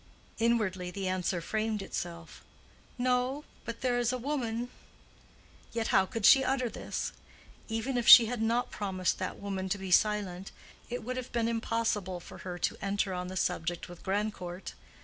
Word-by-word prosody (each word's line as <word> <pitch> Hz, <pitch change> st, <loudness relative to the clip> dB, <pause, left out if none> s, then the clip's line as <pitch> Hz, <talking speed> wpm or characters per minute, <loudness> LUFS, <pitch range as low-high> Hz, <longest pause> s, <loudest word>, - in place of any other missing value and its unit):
Inwardly 215 Hz, -6 st, +1 dB
the 195 Hz, +1 st, -4 dB
answer 185 Hz, -1 st, -1 dB
framed 215 Hz, +3 st, -1 dB
itself. 170 Hz, -3 st, -6 dB, 0.5 s
"No; 255 Hz, +3 st, +1 dB, 0.2 s
but 230 Hz, 0 st, -6 dB
there 245 Hz, -2 st, +1 dB
is 240 Hz, 0 st, +1 dB
a 255 Hz, -, -1 dB
woman." 245 Hz, -3 st, -2 dB, 1.0 s
Yet 230 Hz, -1 st, -1 dB
how 190 Hz, 0 st, +4 dB
could 225 Hz, 0 st, -2 dB
she 270 Hz, +3 st, +8 dB
utter 255 Hz, -2 st, 0 dB
this? -, -, -4 dB, 0.5 s
Even 235 Hz, +3 st, -1 dB
if 240 Hz, -, -3 dB
she 235 Hz, -, +12 dB
had 235 Hz, 0 st, -3 dB
not 235 Hz, +2 st, +1 dB
promised 190 Hz, -3 st, -1 dB
that -, -, -3 dB
woman 195 Hz, -2 st, -4 dB
to 200 Hz, -, 0 dB
be 190 Hz, -1 st, -6 dB
silent, 195 Hz, -2 st, +2 dB, 0.4 s
it 245 Hz, 0 st, -4 dB
would 255 Hz, +3 st, -4 dB
have 255 Hz, -1 st, -5 dB
been 235 Hz, -1 st, +1 dB
impossible 225 Hz, -5 st, -1 dB
for -, -, -12 dB
her 180 Hz, -1 st, -6 dB
to -, -, -1 dB
enter 200 Hz, -1 st, 0 dB
on 180 Hz, 0 st, -3 dB
the 185 Hz, +1 st, -5 dB
subject 170 Hz, 0 st, -1 dB
with 175 Hz, -1 st, -11 dB
Grandcourt. 190 Hz, -2 st, -3 dB
215 Hz, 170 wpm, -30 LUFS, 185-240 Hz, 1.0 s, she